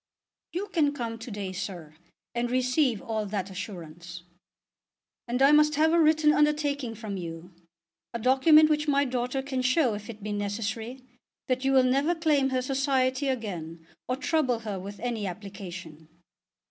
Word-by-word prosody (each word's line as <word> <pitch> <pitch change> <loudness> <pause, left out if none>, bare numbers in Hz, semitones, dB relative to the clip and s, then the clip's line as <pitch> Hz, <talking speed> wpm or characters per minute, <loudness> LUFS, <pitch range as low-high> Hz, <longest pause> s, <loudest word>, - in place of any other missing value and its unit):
"You 380 +4 -3
can 295 -4 +2
come 230 -4 -4
to 225 - -8
day, 200 -3 -4
sir, 175 -5 -6 0.4
and 240 0 -1
receive 255 -1 +1
all 220 -4 -2
that 195 -1 -3
assurance." 175 -3 -8 1.0
"And 250 +3 +1
I 275 - +7
must 300 0 +5
have 315 +2 +3
a 340 - +4
written 310 -1 +4
undertaking 290 -5 +1
from 210 -2 -5
you, 170 0 -7 0.6
a 235 - -3
document 270 +6 +6
which 300 0 0
my 285 -1 +3
daughter 250 +1 -2
can 265 -2 -2
show 255 -1 +2
if 205 +1 -7
it 215 -3 -9
be 210 - -4
necessary, 220 +5 -3 0.4
that 255 0 0
you 270 - +2
will 265 -1 +5
never 275 +7 +2
claim 300 -5 +2
her 255 -1 0
society 265 0 +1
again 175 -10 -4 0.2
or 255 - 0
trouble 270 -4 0
her 210 -4 -4
with 200 +2 -8
any 230 -4 -2
application." 180 -5 -8
245 Hz, 160 wpm, -27 LUFS, 205-280 Hz, 1.0 s, I